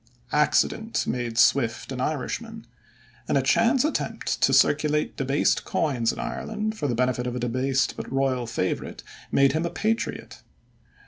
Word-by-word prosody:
Accident 150 +9 +1
made 120 -2 -3
Swift 120 -2 +2
an 130 -1 -4
Irishman, 225 - -4 0.6
and - - +2
a - - +1
chance 270 0 +3
attempt 310 - -2
to - - +4
circulate 150 0 +2
debased 135 +2 +1
coins 125 -7 0
in - - -9
Ireland 215 0 -3
for 150 - -2
the 120 - -1
benefit 125 0 0
of 125 - -3
a - - -2
debased 130 +3 0
but - - -7
royal 135 -3 0
favorite 100 -5 -3 0.3
made 140 -1 +4
him 160 +3 -1
a 170 - -1
patriot. 220 +6 -3
135 Hz, 150 wpm, -25 LUFS, 125-165 Hz, 0.6 s, to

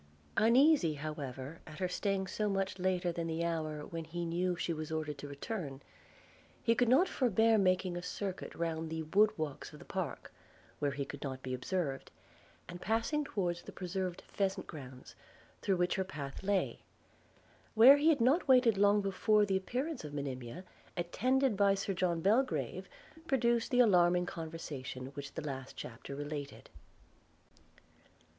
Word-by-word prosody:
Uneasy, 240 - +5
however, 145 -1 -6
at 155 -1 -10
her 185 - 0
staying 195 +1 -1
so 210 +3 -1
much 195 -1 -1
later 180 -1 +1
than 170 0 -3
the 165 +1 -1
hour 155 -3 -2
when 165 -1 -5
he 170 +2 -4
knew 175 +2 0
she 170 0 -2
was 155 0 -5
ordered 155 -2 -3
to 145 - -6
return, 140 -1 -5 0.8
he 230 - +4
could 240 0 +2
not 290 +10 +5
forbear 225 - +3
making 185 -1 +2
a 175 - -3
circuit 190 +1 -5
round 165 -1 -2
the 160 0 -3
wood 200 +7 +4
walks 155 -4 -4
of - - -11
the - - -13
park, - - -4 0.5
where 145 - +1
he 140 0 -3
could 140 +1 -8
not 130 -2 -5
be 130 - -3
observed, 140 +1 -2 0.6
and 175 0 -8
passing 230 +8 0
towards 175 -10 -2
the - - -10
preserved 185 -1 -4
pheasant 195 -1 -1
grounds, 130 -4 -10 0.5
through 195 -2 +1
which 180 0 +2
her 190 - +1
path 140 -6 -7
lay; 200 0 0 1.0
where 250 +6 +9
he 300 +3 +4
had 305 -4 +4
not 265 +9 +3
waited 250 -6 +5
long 205 +1 +5
before 205 +2 +3
the 195 -1 0
appearance 255 - -2
of 145 -1 -7
Monimia, 135 +3 -5 0.3
attended 255 +8 +1
by 200 0 +4
Sir 195 0 -2
John 170 -2 0
Belgrave, 230 +9 +1 0.4
produced 235 -4 +2
the 250 -1 +5
alarming 180 -5 +4
conversation 155 -7 -6
which 140 -1 -7
the 160 - -4
last 135 -2 -6
chapter 125 +3 -7
related. 145 0 -6
180 Hz, 160 wpm, -33 LUFS, 155-210 Hz, 1.0 s, where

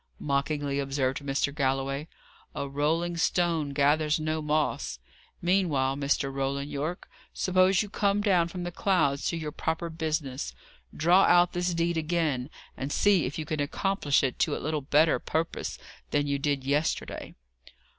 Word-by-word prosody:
mockingly 140 0 -1
observed 135 -1 -1
Mr. 140 0 -1
Galloway, 135 +1 -1 0.5
"a 140 - -3
rolling 160 +5 0
stone 165 -3 +1
gathers 150 +2 +2
no 155 0 -1
moss. 150 0 -1 0.5
Meanwhile, 165 -8 +2
Mr. 140 -1 0
Roland 140 +1 -2
Yorke, 155 +5 -4 0.3
suppose 185 +1 +3
you - - -7
come 200 0 +1
down 185 -5 +3
from 175 +1 -6
the 175 - -4
clouds 160 -7 +1
to 170 - -1
your 155 -2 -4
proper 165 +2 -3
business. 150 - -3 0.4
Draw 175 +5 +4
out 175 0 +5
this 175 0 -1
deed 170 0 0
again, 155 -5 0 0.3
and 135 +2 -4
see 200 -2 +3
if 135 - -6
you 155 - -3
can 155 0 -3
accomplish 145 0 +1
it 130 -2 -1
to - - +2
a - - -3
little 155 0 -2
better 150 +3 +3
purpose 160 +1 -3 0.3
than 145 0 +1
you 140 -1 -1
did 140 -1 0
yesterday." 145 +4 -2
150 Hz, 155 wpm, -28 LUFS, 140-170 Hz, 0.5 s, out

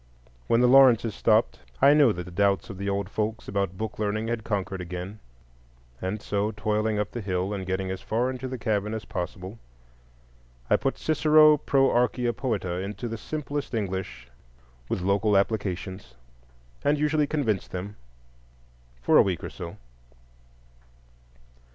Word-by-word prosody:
When 115 +1 +3
the 125 - +5
Lawrences 125 -4 +6
stopped, - - +2 0.2
I 140 - +7
knew 145 -5 +5
that 90 -3 -4
the 90 - -11
doubts 100 +2 +1
of 95 - -10
the 100 0 -2
old 100 -1 -1
folks 110 +2 -3
about 100 -2 -2
book 110 +1 -5
learning 110 +1 -1
had 115 -2 -2
conquered 95 -3 -3
again, 90 +4 -6 0.8
and 100 +3 -3
so, 105 +1 -1
toiling 105 +1 0
up 105 0 -2
the 120 - -5
hill, 95 0 -2
and 95 -2 -5
getting 95 0 -2
as 95 0 -5
far 120 +4 0
into 130 0 -5
the 130 0 -5
cabin 105 -2 -1
as 110 - -6
possible, 95 +1 -6 1.1
I - - +7
put 135 - -1
Cicero 155 0 +5
"pro 135 -2 +2
Archia 120 -1 +1
Poeta" 95 -9 -2
into 100 +4 -5
the 115 - -4
simplest 145 +2 -4
English 95 - -4 0.6
with - - -1
local 100 +2 +2
applications, 95 - -2 0.7
and 145 +1 +2
usually 150 0 +1
convinced 125 - -1
them—for - - -5
a - - +9
week 90 -5 -1
or - - -5
so. - - -8
105 Hz, 150 wpm, -26 LUFS, 95-120 Hz, 1.1 s, a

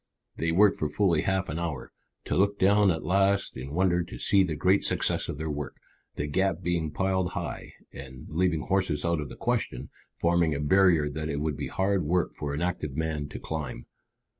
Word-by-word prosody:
They 80 0 0
worked 100 +4 +4
for 75 - 0
fully 85 0 +2
half 95 -1 0
an 75 +3 -4
hour, 80 -6 -4 0.3
to - - -1
look 100 +2 +2
down 100 +1 +4
at 80 -3 -1
last 100 +1 +2
in 70 +3 -6
wonder 90 -1 +2
to 85 - -9
see 100 - +3
the 85 -4 -2
great 95 +6 +3
success - - +1
of - - -4
their 80 +1 -4
work, 75 -1 -5 0.4
the 75 - -2
gap 95 +3 0
being 85 -2 0
piled 95 +2 -1
high, - - -5 0.2
and, 65 -2 -10
leaving 80 -1 0
horses 90 -5 0
out 85 -2 +1
of 75 - -6
the - - -9
question, - - -2 0.3
forming 85 -2 +2
a - - -3
barrier 85 0 +4
that 75 +2 -4
it 70 - -2
would 75 -1 -1
be - - -4
hard 95 -1 0
work 85 +3 0
for 75 - -4
an 80 - -2
active 75 -6 -3
man 80 -2 -2
to - - -7
climb. 75 -6 -5
85 Hz, 205 wpm, -27 LUFS, 75-95 Hz, 0.4 s, worked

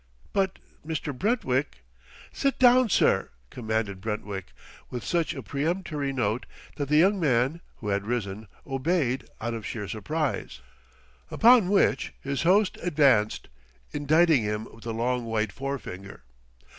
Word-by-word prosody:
"But 190 -1 +1 0.3
Mr. 155 -3 -4
Brentwick 135 - -1 0.2
!" - - -21
"Sit 275 -1 0
down, 250 -1 +6
sir!" - - +3 0.2
commanded 110 -5 -2
Brentwick 105 -3 -4 0.4
with 125 -2 -5
such 170 -2 0
a - - -6
peremptory 150 -1 -2
note 120 -3 -1 0.3
that 145 -2 -3
the 150 - +4
young 195 +5 +4
man, 135 +1 +1
who 105 - -6
had 100 +1 -1
risen, 110 -3 -3 0.2
obeyed 135 -1 -1
out 120 +1 -3
of 115 -1 -5
sheer 105 0 -5
surprise. 130 - -3 0.7
Upon 230 -4 +5
which 195 -9 +2
his 140 -1 -3
host 190 +4 +3
advanced, 140 -11 +2 0.4
indicting 155 0 +3
him 105 +1 -2
with 115 +1 -12
a - - -1
long 120 +2 -1
white 110 -2 -1
forefinger. 100 - -6
135 Hz, 135 wpm, -27 LUFS, 110-165 Hz, 0.7 s, down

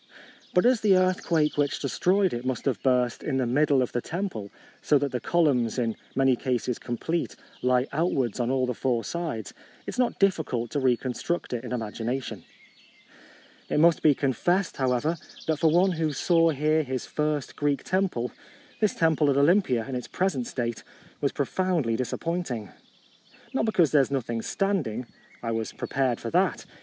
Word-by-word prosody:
But 180 - +4
as 245 -2 +4
the 200 -3 +5
earthquake 175 -5 +1
which 145 -1 +1
de 140 - -2
stroyed 185 - +2
it 120 0 -3
must 130 -1 -3
have 130 -7 0
burst 125 -2 +1
in 135 -3 -1
the 130 - +1
middle 140 +2 +3
of 125 - -4
the 120 - -1
temple, 170 - -4 0.3
so 150 - +4
that 140 -1 -1
the 125 - -2
columns, 135 -10 +1
in 115 -3 0 0.2
many 135 -1 +4
cases 125 -1 -2
complete, 160 +8 -3 0.3
lie 125 0 +3
outwards 135 - 0
on 120 0 0
all 130 -1 +1
the 125 - -2
four 120 -1 0
sides, 155 - -4 0.3
it - - -5
is - - -6
not 250 -2 +1
difficult 155 - 0
to 145 - 0
reconstruct 130 +5 -1
it 120 0 -3
in 125 - -7
imagination. 115 -2 -3 1.3
It - - +1
must 165 0 +5
be 150 -3 +5
confessed, 175 - 0
however, 130 +5 +1 0.3
that 160 -2 0
for 160 - +4
one 180 +4 +4
who 160 -3 -1
saw 165 +3 +3
here 155 +1 +2
his 130 -4 -4
first 150 -3 -2
Greek 145 -1 0
temple, 185 -11 0 0.5
this 215 -2 +1
temple 160 -3 +3
at 140 - +2
Olympia 140 - +3
in 135 - -5
its 125 -1 -4
present 175 -10 -1
state 120 -3 -3 0.4
was - - +1
profoundly 175 -11 0
disappointing. 130 - -3 0.8
Not 245 -4 +1
be - - +2
cause 170 -7 +3
there 150 - +6
is 135 - -1
nothing 120 -4 -2
standing; 155 - -1 0.4
I 115 - -1
was 115 -1 -2
prepared 130 -4 -1
for - - -5
that. - - +1
140 Hz, 175 wpm, -26 LUFS, 125-170 Hz, 1.3 s, there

